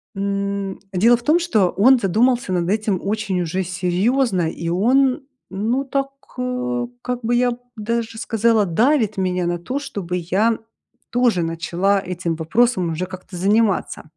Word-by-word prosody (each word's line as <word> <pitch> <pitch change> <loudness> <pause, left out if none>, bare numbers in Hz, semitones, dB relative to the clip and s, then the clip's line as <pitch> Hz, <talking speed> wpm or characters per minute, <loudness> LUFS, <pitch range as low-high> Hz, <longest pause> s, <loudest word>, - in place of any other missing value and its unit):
м 200 0 -2
Дело 225 +6 +4
в 235 - -8
том, 320 +6 +4
что 220 - +2
он 255 +7 +5
задумался 235 +3 +1
над 175 -1 0
этим 210 -3 0
очень 200 -3 -1
уже 185 +3 -1
серьёзно, 185 +2 0
и 170 - -6
он, 255 - +2 0.3
ну, 230 +8 -1
так, 275 0 -1 0.3
э, 250 -1 -2
как 250 0 -3
бы, 235 +2 0
я 245 0 +3
б 240 - -6 0.2
даже 230 +1 -3
сказала, 225 -1 +2
давит 220 - +2
меня 180 -1 0
на 175 0 -1
то, 175 +9 -7
чтобы 190 -10 -5
я 195 +6 +1 0.5
тоже 240 -8 +2
начала 175 +4 0
этим 175 -2 -2
вопросом 185 +3 +1
уже 175 +3 -2
как-то 185 0 -10
заниматься. 205 +2 +1
205 Hz, 150 wpm, -21 LUFS, 180-240 Hz, 0.5 s, он